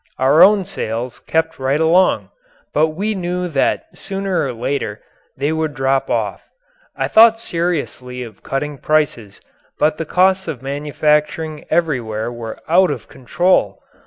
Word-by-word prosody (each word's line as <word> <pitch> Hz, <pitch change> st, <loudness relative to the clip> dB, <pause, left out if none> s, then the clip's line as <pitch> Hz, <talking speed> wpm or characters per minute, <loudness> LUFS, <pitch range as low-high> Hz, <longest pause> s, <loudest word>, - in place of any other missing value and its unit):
Our 135 Hz, +5 st, +4 dB
own 200 Hz, -1 st, +6 dB
sales 120 Hz, -2 st, -4 dB
kept 160 Hz, -1 st, 0 dB
right 135 Hz, +3 st, 0 dB
along, 170 Hz, +4 st, +3 dB, 0.4 s
but 155 Hz, +1 st, +3 dB
we 195 Hz, +8 st, -2 dB
knew 180 Hz, -1 st, -2 dB
that 140 Hz, -4 st, 0 dB
sooner 195 Hz, -5 st, -2 dB
or -, -, -3 dB
later 120 Hz, -3 st, -3 dB, 0.4 s
they 140 Hz, +3 st, 0 dB
would 160 Hz, -2 st, -2 dB
drop 135 Hz, +1 st, 0 dB
off. -, -, -2 dB, 0.5 s
I -, -, -1 dB
thought 225 Hz, 0 st, +6 dB
seriously 160 Hz, -, -3 dB
of 110 Hz, -5 st, -12 dB
cutting 145 Hz, +1 st, -4 dB
prices, 140 Hz, -10 st, -1 dB, 0.4 s
but 155 Hz, 0 st, +1 dB
the 165 Hz, -, -2 dB
costs 190 Hz, +3 st, +2 dB
of 130 Hz, -4 st, -5 dB
manufacturing 150 Hz, +2 st, -1 dB
everywhere 120 Hz, -9 st, -1 dB
were 115 Hz, -2 st, -7 dB
out 180 Hz, +3 st, +4 dB
of 130 Hz, -7 st, -5 dB
control. 175 Hz, +8 st, +1 dB
150 Hz, 140 wpm, -18 LUFS, 130-175 Hz, 0.5 s, own